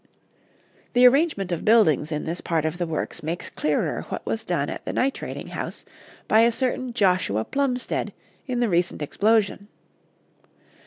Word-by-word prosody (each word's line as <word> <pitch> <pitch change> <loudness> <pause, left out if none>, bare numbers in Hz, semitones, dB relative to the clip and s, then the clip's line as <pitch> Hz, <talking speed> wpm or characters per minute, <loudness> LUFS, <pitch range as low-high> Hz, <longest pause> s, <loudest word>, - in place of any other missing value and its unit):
The 245 +1 +6
arrangement 255 - +2
of 170 - -2
buildings 165 - +4
in 150 -1 -2
this 170 +2 -3
part 160 -2 0
of 160 +3 -2
the 175 - -1
works 160 -1 -4
makes 165 +3 -4
clearer 150 -1 -1
what - - -5
was - - -2
done - - -1
at - - -6
the - - -4
nitrating 270 +1 -2
house - - -6 0.4
by 220 - +5
a 235 +1 +5
certain 255 +1 -2
Joshua 180 - +1
Plumstead 270 -3 -1 0.4
in 250 -2 -1
the 240 - +3
recent 175 -3 0
explosion. 205 +4 +1
200 Hz, 155 wpm, -24 LUFS, 165-245 Hz, 0.4 s, The